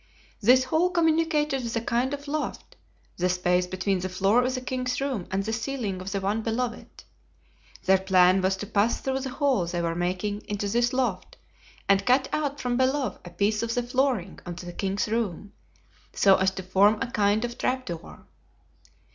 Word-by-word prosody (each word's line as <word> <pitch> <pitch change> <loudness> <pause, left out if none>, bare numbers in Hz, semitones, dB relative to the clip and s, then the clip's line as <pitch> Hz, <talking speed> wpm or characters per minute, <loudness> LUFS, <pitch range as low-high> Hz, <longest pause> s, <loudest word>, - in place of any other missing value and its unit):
This 250 +4 +5
hole 320 +7 +2
communicated 320 -4 +1
with 235 0 -4
a - - +2
kind 240 +3 0
of 285 0 -6
loft—the 285 - -5
space 180 0 +1
between 185 +1 -1
the 185 +1 -3
floor 195 +6 +3
of 255 +1 -1
the - - -2
king's 250 0 -2
room 265 -9 -2
and 195 +1 -1
the 220 +2 -3
ceiling 225 -5 -3
of 190 +1 -6
the 200 - -1
one 200 +3 -1
below 235 +2 -1
it. - - -15 0.8
Their 190 0 +5
plan 185 0 +4
was 190 +1 +1
to 205 - -5
pass 210 +2 +1
through 265 0 -2
the 265 0 -4
hole 260 - +1
they 175 0 -2
were 170 -1 -1
making 185 +4 -2
into 205 0 -2
this 240 +4 +1
loft 245 -8 -2 0.5
and 195 0 +4
cut 260 +3 +3
out 290 -2 -1
from 245 -2 -1
below 260 +1 0
a 175 - -9
piece 200 +5 0
of 230 0 -2
the 245 - 0
flooring 245 -6 -1
of 175 -1 -6
the 175 0 -8
king's 195 +1 -1
room, 210 -3 -3 0.6
so 195 -1 +5
as 190 0 +2
to 190 0 -7
form 200 +4 +3
a - - -1
kind 210 +2 +2
of 240 0 -7
trap 255 0 -1
door. 170 -2 -8
215 Hz, 190 wpm, -26 LUFS, 190-255 Hz, 0.8 s, This